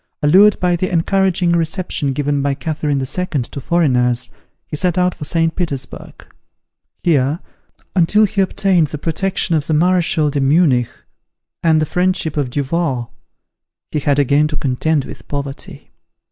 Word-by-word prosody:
Allured 190 +7 +5
by 180 -1 +2
the 185 +2 -2
encouraging 180 0 +1
reception 170 -3 -1
given 145 +1 -1
by 140 0 0
Catherine 150 -2 -2
II. 135 - -2 0.4
to 140 +4 -8
foreigners, 125 -7 +1 0.3
he - - -6
set 180 +3 0
out 180 0 +2
for 150 - -8
St. 165 +1 0
Petersburg. 140 -7 -6 0.8
Here, 150 -1 +2 0.6
until 200 +4 +4
he 200 0 0
obtained 185 -3 +2
the 150 - -6
protection 170 +4 -1
of 150 -2 -1
the 155 - +1
Marechal 165 -3 +2
de 140 - -1
Munich, 135 -4 +3 0.7
and 160 -2 +3
the 155 - +1
friendship 180 -1 0
of 145 -4 -1
Duval, 135 -2 -2 0.8
he 150 - -1
had 145 0 +1
again 145 +2 +3
to 150 -1 -4
contend 145 +2 0
with - - -11
poverty. 140 -1 -6
155 Hz, 145 wpm, -17 LUFS, 140-175 Hz, 0.8 s, Allured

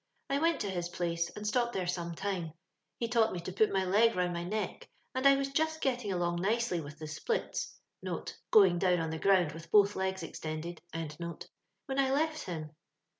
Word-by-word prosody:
I 280 - +2
went 330 -1 +2
to 205 - -1
his 175 -2 -2
place, 170 -1 -1
and 210 - -6
stopped 240 +2 +1
there 185 -2 -1
some 170 -1 -2
time. 180 -4 -3 0.4
He 235 - -1
taught 230 -1 +3
me 180 - -3
to 180 +2 -6
put 210 +3 +3
my 190 -1 +1
leg 220 +5 +4
round 180 -1 +1
my 170 0 -3
neck, 210 +5 -3 0.2
and 260 +1 +3
I 275 - +8
was 275 0 -1
just 315 +3 0
getting 250 -8 0
along 175 -1 0
nicely 215 -3 +1
with 150 0 -9
the 155 - -7
splits 310 - -3 0.7
(going 190 -5 +6
down 180 -2 +3
on 160 -1 -2
the 160 - -4
ground 185 -5 +4
with 165 +2 -10
both 205 0 +5
legs 190 -1 -1
extended), 160 +1 -5 0.2
when 170 - -6
I 265 -1 +3
left 310 +3 0
him. 155 -4 -5
190 Hz, 195 wpm, -32 LUFS, 170-235 Hz, 0.7 s, I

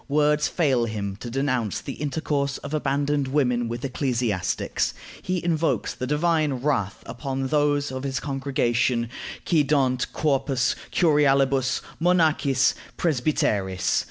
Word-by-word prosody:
Words 150 +1 +3
fail 135 -8 +1
him 100 -3 -4
to 120 - -7
denounce 130 -4 -1
the - - -6
intercourse 140 -1 -2
of 145 - -8
abandoned 145 -1 0
women 125 -4 +1
with 120 +3 -4
ecclesiastics; 120 -8 -1 0.3
he 180 -1 -2
invokes 165 -1 0
the 130 - -4
divine 155 0 +1
wrath 125 -7 -1
upon 130 +3 -4
those 145 -1 +1
of 130 0 -4
his 135 -1 -2
congregation 130 -4 0 0.4
quæ 155 -5 +2
dant 130 -4 +1
corpus 135 -3 +1 0.2
curialibus, 140 -5 +3 0.2
monachis, 155 -6 +3 0.2
presbyteris. 110 - +1
135 Hz, 120 wpm, -24 LUFS, 125-150 Hz, 0.4 s, Words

